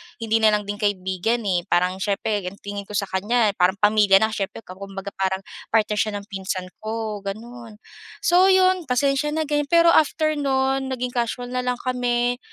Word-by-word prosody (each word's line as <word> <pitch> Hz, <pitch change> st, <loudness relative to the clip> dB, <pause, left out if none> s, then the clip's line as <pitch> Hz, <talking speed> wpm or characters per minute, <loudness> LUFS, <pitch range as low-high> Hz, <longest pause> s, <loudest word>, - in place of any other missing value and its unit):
hindi 225 Hz, -1 st, 0 dB
na 220 Hz, -, +4 dB
lang 210 Hz, -, -2 dB
din 205 Hz, 0 st, -6 dB
kaibigan, 205 Hz, +3 st, -1 dB
eh, 180 Hz, -3 st, -1 dB
parang 180 Hz, +2 st, +1 dB
siyempre 205 Hz, +1 st, -1 dB
ang 190 Hz, -, -6 dB
tingin 200 Hz, 0 st, -6 dB
ko 210 Hz, -, -7 dB
sa 200 Hz, -, +1 dB
kanya 210 Hz, +3 st, +1 dB
parang 180 Hz, +2 st, +3 dB
pamilya 210 Hz, -1 st, +5 dB
na 220 Hz, -, +1 dB
siyempre 205 Hz, +1 st, -4 dB
ka 185 Hz, +1 st, -12 dB
kumbaga 195 Hz, 0 st, -7 dB
parang 190 Hz, 0 st, -1 dB, 0.2 s
partner 215 Hz, -1 st, +1 dB
siya 215 Hz, -, +1 dB
ng -, -, -17 dB
pinsan 190 Hz, -1 st, -4 dB
ko, 220 Hz, -1 st, -4 dB
gano'n. 225 Hz, +3 st, -8 dB, 0.5 s
So, 360 Hz, +2 st, +5 dB
'yon, 370 Hz, -3 st, +3 dB
pasensiya 275 Hz, +4 st, +1 dB
na 315 Hz, -, 0 dB
ganyan. 295 Hz, -1 st, -1 dB
Pero 335 Hz, +1 st, +5 dB
after 310 Hz, 0 st, +3 dB
nun 270 Hz, -1 st, 0 dB
naging 250 Hz, -1 st, -3 dB
casual 245 Hz, +1 st, -3 dB
na 255 Hz, -, -1 dB
lang 250 Hz, 0 st, -1 dB
kami. 245 Hz, -1 st, 0 dB
220 Hz, 185 wpm, -23 LUFS, 200-255 Hz, 0.5 s, pamilya